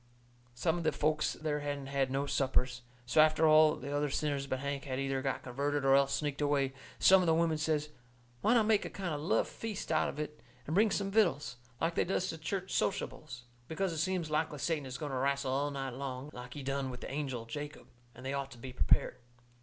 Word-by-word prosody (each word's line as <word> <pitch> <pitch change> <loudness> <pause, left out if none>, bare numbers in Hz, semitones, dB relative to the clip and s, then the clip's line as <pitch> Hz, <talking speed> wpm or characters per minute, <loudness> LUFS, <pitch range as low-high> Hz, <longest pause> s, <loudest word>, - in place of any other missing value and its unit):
Some 160 +7 0
of - - -4
the 155 - +3
folks 155 0 +1
there 150 -1 -2
hadn't 145 -1 -3
had 135 -1 0
no 135 +2 0
suppers, 130 -2 0 0.2
so 125 +5 +5
after 155 +1 +4
all 155 0 +6
the 140 +1 -5
other 145 0 +1
sinners 140 -1 -1
but 130 - -1
Hank 140 +1 -3
had 130 -2 -3
either 135 -1 -1
got 135 -1 -2
converted 140 +3 -1
or 135 - +6
else 140 0 +4
sneaked 145 0 -1
away, 140 -2 +1 0.2
some 190 0 +7
of 180 - 0
the 160 - +4
women 165 -2 +2
says 155 -1 0 0.5
why 230 +3 +4
not 225 -3 +4
make 215 -1 +3
a - - -5
kind 185 -5 -4
of 145 - -3
love 160 - +2
feast 215 -6 -5
out 155 - +2
of - - -7
it, 150 0 -5 0.2
and 155 - -3
bring 210 +5 +5
some 195 0 -1
vittles, 175 - +2 0.2
like 165 +1 +1
they - - +2
does 185 0 -1
to 160 - -5
church 185 +4 -3
sociables. 135 -9 -2 0.2
Because 185 +2 -1
it 160 - -3
seems 175 -2 -1
likely 155 0 0
Satan 150 -2 -1
is 125 -1 -5
going 145 0 -4
to 130 - -2
wrastle 140 0 0
all 140 +2 +1
night 135 -2 -4
long, 135 +2 -5
like 125 0 -9
he 145 - -6
done 135 0 -1
with 125 -1 -7
the - - -6
angel 135 -5 -3
Jacob, 145 +5 -7 0.3
and 125 - -11
they 135 - -2
ought 140 -1 -2
to 120 - -12
be 125 +2 -8
prepared. 125 - +2
145 Hz, 230 wpm, -32 LUFS, 135-160 Hz, 0.5 s, some